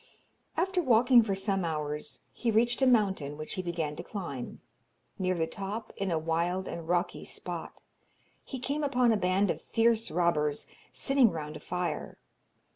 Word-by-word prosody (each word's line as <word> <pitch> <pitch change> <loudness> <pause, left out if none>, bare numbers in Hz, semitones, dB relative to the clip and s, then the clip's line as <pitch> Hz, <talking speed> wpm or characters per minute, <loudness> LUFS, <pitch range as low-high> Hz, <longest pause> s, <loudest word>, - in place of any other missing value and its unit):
After 370 +2 +2
walking 245 -2 +6
for 205 -3 -1
some 195 -1 0
hours 150 -2 -2
he 240 - -1
reached 235 +3 +2
a 265 - +5
mountain, 190 - +2
which 155 0 -5
he 185 - -2
began 165 -4 -2
to - - -5
climb. 155 - -6 0.6
Near 185 -1 +1
the 165 -2 +1
top, 200 +6 -5
in 195 -1 -2
a 165 - +1
wild 170 +4 0
and 165 -1 -6
rocky 175 +1 0
spot, - - -5 0.6
he 265 - -6
came 280 +4 -2
upon 250 -4 +3
a - - +4
band 190 0 +2
of - - -5
fierce 230 0 +2
robbers, 150 -4 +1 0.3
sitting 270 -4 +3
round 155 -3 -5
a - - -7
fire. 180 0 -3
190 Hz, 165 wpm, -30 LUFS, 165-230 Hz, 0.6 s, walking